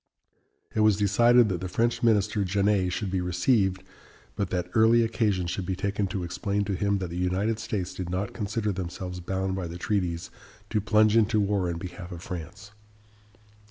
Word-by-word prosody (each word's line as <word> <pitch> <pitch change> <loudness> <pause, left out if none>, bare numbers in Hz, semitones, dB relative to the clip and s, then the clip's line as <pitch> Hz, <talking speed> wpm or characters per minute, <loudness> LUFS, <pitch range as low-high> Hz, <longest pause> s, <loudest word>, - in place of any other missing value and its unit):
It - - -1
was 110 -2 +4
decided 120 +4 +5
that 90 -2 -2
the 95 - -4
French 115 +4 0
minister, 105 -3 +2
Genet, 100 -1 +1
should 95 +1 -3
be 95 -1 0
received, 95 +1 +1 0.5
but 100 -3 -2
that 90 -1 -2
early 115 +1 +5
occasion 105 -5 0
should 90 +1 -3
be 95 - -1
taken 100 +1 -1
to 95 -1 -3
explain 100 +3 -2
to 100 - -2
him 100 +1 +1
that 90 -3 -4
the 85 - -5
United 95 +5 0
States 95 -4 -3
did 90 -2 -5
not 95 +3 -2
consider 105 0 -2
themselves 90 0 -5
bound 95 +1 -2
by 95 -3 -3
the 85 +1 -7
treaties 90 -2 -2 0.4
to 110 -1 +1
plunge 110 +1 +4
into 110 -1 +3
war 100 -3 +1
in 85 - -3
behalf 90 +1 -8
of 85 0 -8
France. 95 +4 -8
100 Hz, 185 wpm, -27 LUFS, 90-105 Hz, 0.5 s, decided